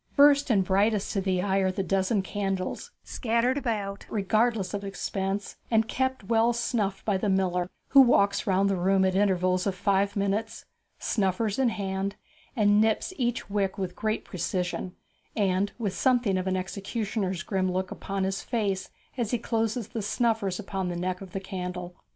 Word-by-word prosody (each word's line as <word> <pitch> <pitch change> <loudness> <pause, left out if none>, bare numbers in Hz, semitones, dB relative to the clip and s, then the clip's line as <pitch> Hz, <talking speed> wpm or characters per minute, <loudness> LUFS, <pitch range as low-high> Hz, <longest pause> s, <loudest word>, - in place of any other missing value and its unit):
First 285 0 +6
and 200 -5 +4
brightest 200 +2 +1
to 195 - 0
the 185 -2 0
eye 195 -1 +1
are 190 -1 +2
the 195 +1 -2
dozen 195 +2 +1
candles, 195 - -3
scattered 235 +2 0
about 205 -6 -3
regardless 215 -1 +1
of 205 0 -3
expense, 195 0 -3
and 225 -1 +3
kept 260 0 -1
well 230 +3 +3
snuffed 230 -4 -1
by 205 -3 +2
the 200 +2 -1
miller, 180 -2 +1 0.2
who 275 - +8
walks 200 -4 +3
round 195 +1 +3
the 195 -1 +1
room 190 +1 +3
at 190 - +2
intervals 185 -1 +2
of 195 - -1
five 200 +1 +1
minutes, 200 +2 -1 0.3
snuffers 205 +2 0
in 260 -2 +4
hand, 195 -1 -3 0.4
and 210 -2 +4
nips 220 - +1
each 245 -2 -1
wick 200 -1 -1
with 185 -2 -3
great 215 0 -2
precision, 180 0 -3 0.4
and 200 -1 +1
with 210 -6 -2
something 240 -3 +2
of 185 0 -1
an 185 0 +1
executioner's 195 -1 -3
grim 185 -2 0
look 185 0 -2
upon 195 -1 -3
his 190 0 -1
face 200 -5 -2 0.3
as 230 -4 0
he 245 - +1
closes 225 -1 -1
the 225 - -4
snuffers 215 -3 0
upon 195 -2 -3
the 175 - -3
neck 180 +1 -2
of 190 -2 -9
the 195 - -3
candle. 180 -2 -5
200 Hz, 175 wpm, -27 LUFS, 190-220 Hz, 0.4 s, who